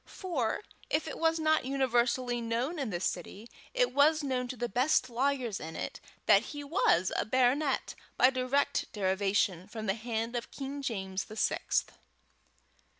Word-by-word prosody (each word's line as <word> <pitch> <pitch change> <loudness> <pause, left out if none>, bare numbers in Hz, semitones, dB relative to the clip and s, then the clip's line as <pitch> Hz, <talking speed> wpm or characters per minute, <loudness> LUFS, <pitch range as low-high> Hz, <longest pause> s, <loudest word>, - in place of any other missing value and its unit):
For, 330 - -2 0.3
if 315 +1 0
it - - -6
was 325 0 +3
not 315 0 +3
universally 250 -2 +1
known 240 +8 -1
in 270 -5 -2
the 175 -4 -2
city, 190 +4 -4 0.2
it - - +1
was 305 +2 +4
known 255 -2 -1
to 255 0 -6
the 240 +1 -1
best 255 +2 +2
lawyers 255 -3 0
in 160 +1 -7
it, - - -5 0.3
that 200 -2 +6 0.2
he 290 - -5
was 235 - +2
a - - +1
baronet 260 +4 +1 0.2
by 255 - +6
direct 260 +2 0
derivation 195 -2 +1
from 220 0 -6
the 195 - +2
hand 230 +1 -3
of 235 - -3
King 280 +1 -6
James 195 -6 -3
the 215 - -10
Sixth. - - 0
245 Hz, 160 wpm, -31 LUFS, 215-280 Hz, 0.3 s, that